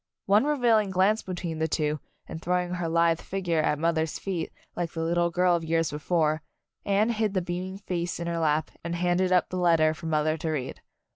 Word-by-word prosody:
One 205 +6 +4
revealing 240 -8 +3
glance 190 +4 +2
between 175 -3 -5
the 160 - +1
two, 150 -1 -1 0.3
and 160 - -7
throwing 180 0 0
her 175 -2 -2
lithe 165 0 +2
figure 175 -4 -1
at 150 - +1
mother's 160 0 0
feet, 180 -5 -3 0.2
like 175 -2 -3
the 165 - -2
little 170 +1 +1
girl 180 +1 +3
of 170 - -2
years 165 -1 0
before, 155 0 0 0.4
Anne 200 +3 +2
hid 215 -3 0
the - - +3
beaming 180 +2 -4
face 175 -4 -3
in 170 - -3
her 170 0 -2
lap 155 -1 +1
and 170 +1 -3
handed 180 +1 +1
up 180 -1 +3
the 185 - -4
letter 165 -3 +4
for 165 +1 -8
mother 155 0 +1
to 160 +1 -3
read. 140 -5 -3
170 Hz, 205 wpm, -27 LUFS, 160-185 Hz, 0.4 s, One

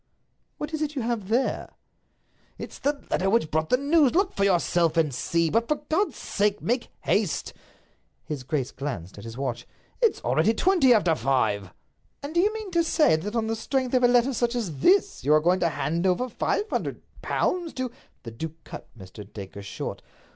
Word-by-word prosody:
"What 300 +2 -5
is 315 - -2
it 300 -1 -2
you 260 - -2
have 225 -4 -2
there?" 240 +5 -1 0.8
"It's - - -8
the 285 0 -1
letter 190 +1 +1
which 200 -7 +2
brought 155 0 0
the 250 - +4
news—look 315 +6 +3
for 200 - 0
yourself 175 -3 +2
and 155 -4 +2
see; 165 +6 0
but, 230 +1 +1
for 300 - +2
God's 315 +8 -1
sake, 205 0 0
make 240 +2 -1
haste!" 205 -6 0 0.7
His 150 -3 -4
grace 135 0 -2
glanced 105 - -6
at 100 - -10
his 115 +1 -8
watch. 125 -3 -3 0.3
"It's 460 -3 +3
already 225 - +2
twenty 355 - +4
after 200 -8 +4
five." 110 - 0 0.5
"And 285 +2 -5
do 340 - +2
you 410 +4 +4
mean 435 -3 -6
to 340 -1 +3
say 305 - +4
that 205 +8 -4
on 230 -1 +1
the 225 0 -1
strength 260 +3 -2
of 255 - +4
a - - +7
letter 245 +2 +3
such 240 +1 0
as 180 - -3
this 395 +2 +3
you 150 +2 +4
are - - +6
going 175 +4 +2
to 170 - +2
hand 165 +4 -1
over 185 +8 +1
five 415 - -1
hundred - - -3 0.2
pounds 350 -3 -1
to—" 255 -2 -3 0.3
The 115 - -7
duke 160 +7 -7
cut - - -9
Mr. 100 +1 -11
Dacre 100 -1 -8
short. 100 - -6
210 Hz, 195 wpm, -26 LUFS, -, 0.8 s, a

